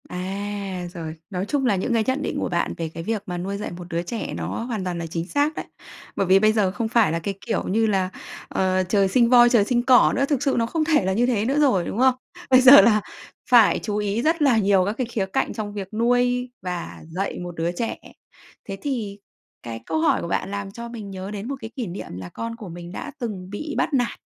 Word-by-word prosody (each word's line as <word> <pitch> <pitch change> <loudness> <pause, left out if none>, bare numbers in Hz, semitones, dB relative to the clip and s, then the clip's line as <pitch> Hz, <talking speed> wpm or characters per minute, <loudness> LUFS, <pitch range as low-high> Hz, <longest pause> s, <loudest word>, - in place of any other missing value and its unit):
À, 195 0 -4
rồi, 160 -2 -6
nói 185 -1 -3
chung 270 +4 -1
là 225 -5 +3
những 190 +5 -1
cái 225 -1 +2
nhận 260 +2 0
định - - -3
của - - -2
bạn 170 - -1
về 165 -1 -3
cái 165 - -6
việc 215 +1 -2
mà 180 -1 -4
nuôi 195 +3 -3
dạy 210 - -5
một 175 0 -9
đứa 170 -1 -2
trẻ 220 +5 -5
nó - - -4 0.2
hoàn 230 -5 -3
toàn 180 -1 -3
là 170 - -4
chính 165 +1 -4
xác 290 +6 0
đấy. - - -5 0.5
Bởi 195 - 0
vì 190 +1 +6
bây 215 +1 +4
giờ 205 -4 +2
không 225 +3 -2
phải 225 -6 +3
là 165 - -1
cái 195 +4 -3
kiểu - - -1
như 220 +4 +2
là, 190 -3 +1 0.4
ờ, 185 0 +1
trời 200 -1 +3
sinh 235 +4 +3
voi, 240 -1 +7
trời 235 -4 +4
sinh 240 +1 +1
cỏ 250 -1 +5
nữa. 275 - +2
Thực 280 -1 -1
sự 275 - +1
nó 230 - +2
không 315 +7 -1
thể 300 - +2
là 190 - +1
như 235 +5 +2
thế 225 -4 +1
nữa 275 +5 +1
rồi, 230 -12 +3
đúng - - -4
không? 260 0 +5 0.3
Bây 255 0 +7
giờ 265 +2 +10
là 215 -2 +4 0.5
phải 240 -4 +6
chú 210 -1 -3
ý 210 +2 -1
rất 320 +4 +1
là 270 -6 +4
nhiều 195 -3 +3
các 205 - -1
cái 255 - 0
khía 220 -4 -2
cạnh 190 - -1
trong 210 -2 -5
việc 200 -1 -6
nuôi 245 +2 +1
và 180 -1 -5
dạy 190 +4 -3
một 175 -1 -7
đứa 165 +1 -1
trẻ. 225 +6 -3 0.7
Thế 195 -1 -6
thì 220 -8 -3 0.4
cái 115 -1 -6
câu 160 -1 -1
hỏi 160 - +2
của - - -4
bạn 195 - -2
làm 200 -1 -4
cho 235 +3 -8
mình 215 -4 -8
nhớ 190 +1 -6
đến 210 +1 -5
một 275 - -3
cái 220 - -6
kỷ 245 -5 -3
niệm 175 - -7
là 90 -1 -7
con 230 - -5
của 215 -5 -9
mình 170 +1 -9
đã 290 - -6
từng 200 -7 -5
bị 295 +10 -5
bắt 315 - 0
nạt. 245 -3 0
205 Hz, 255 wpm, -23 LUFS, 185-240 Hz, 0.7 s, giờ